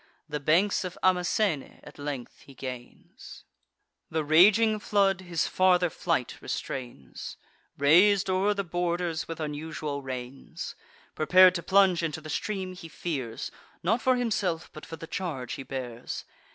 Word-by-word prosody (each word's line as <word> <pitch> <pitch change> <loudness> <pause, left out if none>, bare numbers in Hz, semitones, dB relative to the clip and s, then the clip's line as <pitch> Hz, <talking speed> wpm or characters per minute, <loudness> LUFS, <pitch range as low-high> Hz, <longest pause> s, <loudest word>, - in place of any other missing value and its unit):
The 150 -1 -3
banks 170 +10 +2
of 185 -1 -6
Amasene 180 -3 +1
at - - -13
length 145 -4 -5
he 135 - -14
gains: 125 -2 -9 0.7
The 160 0 -1
raging 210 +8 +5
flood 195 -2 +2
his 175 -3 -1
farther 180 -2 +3
flight - - -2
restrains, 120 - -6 0.4
Rais'd 185 +8 +5
o'er 190 +2 +2
the 200 - -1
borders 175 -1 -2
with 165 -1 -6
unusual 150 -1 -4
rains. 130 0 -6 0.4
Prepar'd 180 +4 +6
to 175 - -2
plunge 190 -1 +4
into 160 -2 -2
the 155 -1 -8
stream, 190 -1 -3
he 180 -2 -10
fears, 135 -9 -4 0.3
Not 220 +8 +2
for 255 +2 +3
himself, 195 -9 -1
but 155 - -10
for 165 - -6
the 165 - -9
charge 160 -8 -4
he - - -5
bears. 125 -3 -6
170 Hz, 140 wpm, -28 LUFS, 145-185 Hz, 0.7 s, Prepar'd